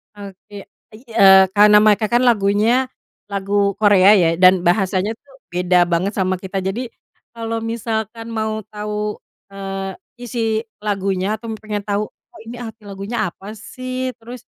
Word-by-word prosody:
Oke. 200 0 -11 0.3
Ei 215 - -13
eee, 190 -3 +7
karena 210 +1 +6
mereka 215 0 +3
kan 240 +3 +2
lagunya 230 +2 +2 0.4
lagu 200 0 0
Korea 205 -1 +5
ya, 175 -5 +3
dan 185 -1 +6
bahasanya 190 +2 +1
tuh 275 +2 -24 0.2
beda 180 0 +3
banget 180 +5 0
sama 185 -1 0
kita. 190 0 -4
Jadi 225 +7 -3 0.5
kalau 230 0 -3
misalkan 225 0 -4
mau 220 -1 -3
tahu, 210 0 -4 0.3
eee, 195 0 -5 0.2
isi 230 -2 -2 0.2
lagunya 195 -1 -1
atau 225 +1 -8
pengen 210 -2 -5
tau, 205 +1 -2
"Oh, - - -21
ini 240 - -7
arti 225 -2 -9
lagunya 200 +3 -3
apa 195 +4 -10
sih?" 255 +3 -5
Terus 240 +1 -11
210 Hz, 145 wpm, -19 LUFS, 195-225 Hz, 0.5 s, eee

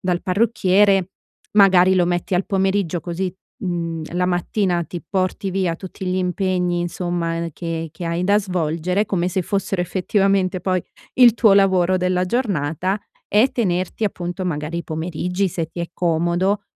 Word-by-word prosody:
dal 180 -1 -1
parrucchiere, 195 -2 +2 0.4
magari 190 -2 +6
lo 180 -1 +3
metti 175 +2 -1
al 180 - +1
pomeriggio 190 -3 0
così, 180 +3 -3 0.3
mhmm, 170 -2 -2
la 180 0 +1
mattina 180 0 0
ti 170 +2 -7
porti 190 0 -1
via 185 -3 -1
tutti 190 +1 -8
gli 180 0 0
impegni, 180 -1 0
insomma, 175 -1 -2
ehm, 170 0 -3
che 165 0 -4
che 175 - -7
hai 170 +2 -1
da 205 +2 +4
svolgere, 180 +1 -1
come 180 -2 0
se 185 +1 -1
fossero 195 0 -1
effettivamente 190 +1 +1
poi 185 -1 0 0.3
il 245 -3 +7
tuo 220 -4 +5
lavoro 185 -2 +3
della 180 0 +1
giornata, 185 - -1 0.3
e 220 +6 +4
tenerti 185 -3 -1
appunto 180 -2 -3
magari 155 -1 -3
i 170 - -5
pomeriggi, 175 +4 -2
se 165 -1 -3
ti 175 - -11
è 170 - -3
comodo, 175 +4 0
180 Hz, 155 wpm, -21 LUFS, 175-195 Hz, 0.4 s, il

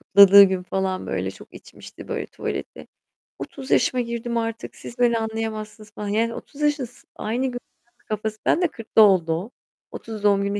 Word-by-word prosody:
kutladığı 200 0 +8
gün 190 -1 -1
falan, 190 0 -2
böyle, - - -2
çok - - -15
içmişti, - - -13
böyle, - - -3
tuvaleti. - - -6 0.5
"30 270 -2 -8
yaşıma 250 -1 +3
girdim 235 0 -3
artık. 225 0 -4
Siz 240 - -11
beni 235 -1 +3
anlayamazsınız." 220 -1 -5
falan 210 -1 -6
yani, 225 +3 0
30 295 0 -10
yaşındasın 285 -5 -2
aynı 240 +5 -2
gün 245 - -5 0.5
kafası 215 0 -3
ben 350 - +3
de 355 - +4
40'ta 225 -5 +1
oldu 185 -6 +5
o. 190 +9 -4 0.4
30 220 -2 -8
doğum 200 -1 +4
gününde 200 +1 -1
220 Hz, 170 wpm, -23 LUFS, 200-235 Hz, 0.5 s, kutladığı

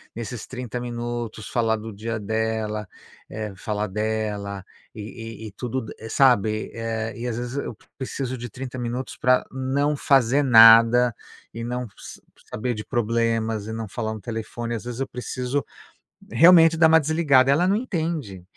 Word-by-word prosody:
nesses 115 +1 -6
30 125 -2 -5
minutos 120 -2 -5
falar 115 -2 +1
do 110 +1 -7
dia 110 +3 -4
dela, 110 0 -2 0.4
eh, 110 -2 -5
falar 105 +2 -2
dela 105 -1 -3 0.3
e 110 0 -8
e - - -10
tudo, 125 +4 -4 0.2
sabe. 110 -4 +2
Eh, 115 -1 -3
e 120 - -3
às 120 - -2
vezes 120 +2 -4
eu 140 - -4 0.2
preciso 130 -1 -4
de 120 0 -7
30 130 +3 -7
minutos 120 +2 -4
pra 125 0 +3
não 140 +3 0
fazer 135 0 +3
nada 115 0 +7 0.4
e 115 - -6
não 125 +1 -3
sa - - -11 0.3
saber 120 +3 -2
de 105 -1 -7
problemas 115 -2 0
e 110 - -5
não 115 0 -4
falar 110 +1 -4
no 110 - -8
telefone, 115 +1 -5
as 115 - -7
vezes 120 +1 -5
eu 135 - -1
preciso 125 +2 -3 0.7
realmente 165 +4 +7
dar 160 -1 +6
uma 160 0 +7
desligada. 145 -4 +3
E - - +5
ela 175 +6 +3
não 200 - +3
entende 160 - -3
120 Hz, 160 wpm, -24 LUFS, 110-130 Hz, 0.7 s, nada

